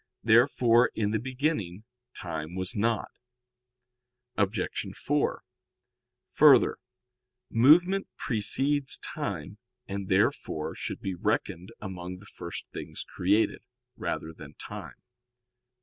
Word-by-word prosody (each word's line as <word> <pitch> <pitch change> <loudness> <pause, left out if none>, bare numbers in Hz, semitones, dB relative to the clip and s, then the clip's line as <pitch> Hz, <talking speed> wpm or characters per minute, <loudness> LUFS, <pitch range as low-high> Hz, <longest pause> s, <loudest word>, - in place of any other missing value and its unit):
Therefore 120 +1 +5
in 105 -2 0
the 110 - 0
beginning 125 - -2 0.3
time 80 -2 -5
was 95 +4 -3
not. 110 +1 0 1.2
Obj. 100 -1 +1 0.4
4: - - 0 0.9
Further, 140 -5 +6 0.7
movement 175 +11 +5
precedes 135 +5 +2
time, 105 - -5 0.3
and 100 0 -4
therefore 95 -4 +1
should - - -5
be 95 - -3
reckoned 90 0 -2
among 90 -2 -6
the 100 - -15
first 85 -4 -8
things - - -6
created, 100 +5 +1 0.3
rather 80 - -4
than 75 -1 -12
time. - - -9
105 Hz, 100 wpm, -28 LUFS, 90-125 Hz, 1.2 s, Further